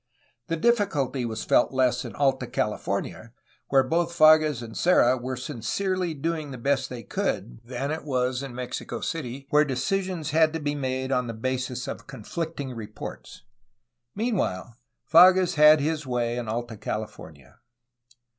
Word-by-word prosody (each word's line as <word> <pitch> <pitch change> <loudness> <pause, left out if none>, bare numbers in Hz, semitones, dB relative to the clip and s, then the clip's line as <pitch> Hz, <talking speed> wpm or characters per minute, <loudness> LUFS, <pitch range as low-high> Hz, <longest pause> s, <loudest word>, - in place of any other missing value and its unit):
The 165 - -1
diffi 235 +2 +3
culty 135 -5 -2
was 110 -1 -4
felt - - +3
less 125 -2 +1
in - - -8
Alta 135 -3 +1
California, 105 +1 -3 0.3
where 135 -1 +4
both 170 +5 -1
Fages 155 -5 +5
and 115 -1 -9
Serra 130 -8 +4
were 130 +1 -4
sincerely 165 - -2
doing 155 0 -3
the 130 - -7
best 135 +1 0
they 120 -2 -7
could, - - -3
than 130 +4 -4
in 130 -4 -2
Mexico 125 0 -5
City, 135 -4 -4
where 150 +1 +5
decisions 160 +4 -2
had 160 0 +4
to 160 - -2
be 145 -1 -2
made 130 -2 -2
on 125 -2 +1
the 115 - -5
basis 130 +1 -3
of - - -7
conflicting 140 +2 -5
reports. 110 -2 -9 0.7
Meanwhile, 180 - -2 0.3
Fages 180 +3 +6
had 150 0 +7
his 150 0 -2
way 120 -1 -1
in 120 -2 -4
Alta 115 0 -4
California. 80 -12 -7
130 Hz, 145 wpm, -26 LUFS, 120-155 Hz, 0.7 s, had